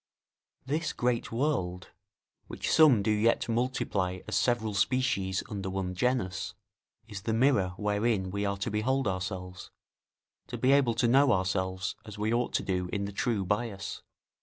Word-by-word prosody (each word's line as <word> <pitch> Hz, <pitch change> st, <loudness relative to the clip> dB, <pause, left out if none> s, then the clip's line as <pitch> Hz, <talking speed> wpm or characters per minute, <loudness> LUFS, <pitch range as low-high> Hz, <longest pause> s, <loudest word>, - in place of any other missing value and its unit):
This 150 Hz, +3 st, -1 dB
great 120 Hz, -1 st, -1 dB
world 115 Hz, -9 st, -1 dB, 0.6 s
which -, -, -3 dB
some 140 Hz, -10 st, +6 dB
do 110 Hz, -, +1 dB
yet 105 Hz, +2 st, +2 dB
multiply 110 Hz, -6 st, -1 dB
as -, -, -2 dB
several 115 Hz, -3 st, +1 dB
species 100 Hz, -3 st, +1 dB
under 100 Hz, -4 st, -4 dB
one 95 Hz, -1 st, -3 dB
genus, 100 Hz, -3 st, -1 dB, 0.5 s
is 100 Hz, -3 st, -7 dB
the 110 Hz, -, -1 dB
mirror 115 Hz, -7 st, +2 dB
wherein 105 Hz, -2 st, 0 dB
we 100 Hz, +1 st, -2 dB
are 100 Hz, 0 st, -1 dB
to 100 Hz, -, -3 dB
behold 130 Hz, +5 st, 0 dB
ourselves, 95 Hz, -1 st, -4 dB, 0.8 s
to 120 Hz, -, -5 dB
be 130 Hz, +3 st, +3 dB
able 135 Hz, -5 st, +4 dB
to 120 Hz, +1 st, +2 dB
know 135 Hz, +3 st, +5 dB
ourselves 95 Hz, -1 st, -1 dB
as 105 Hz, -1 st, -10 dB
we 105 Hz, +2 st, 0 dB
ought 120 Hz, +1 st, 0 dB
to -, -, 0 dB
do 90 Hz, -1 st, -2 dB
in 100 Hz, -1 st, -1 dB
the 100 Hz, -, -5 dB
true 105 Hz, -2 st, 0 dB
bias. 105 Hz, 0 st, -3 dB
105 Hz, 160 wpm, -29 LUFS, 95-120 Hz, 0.8 s, some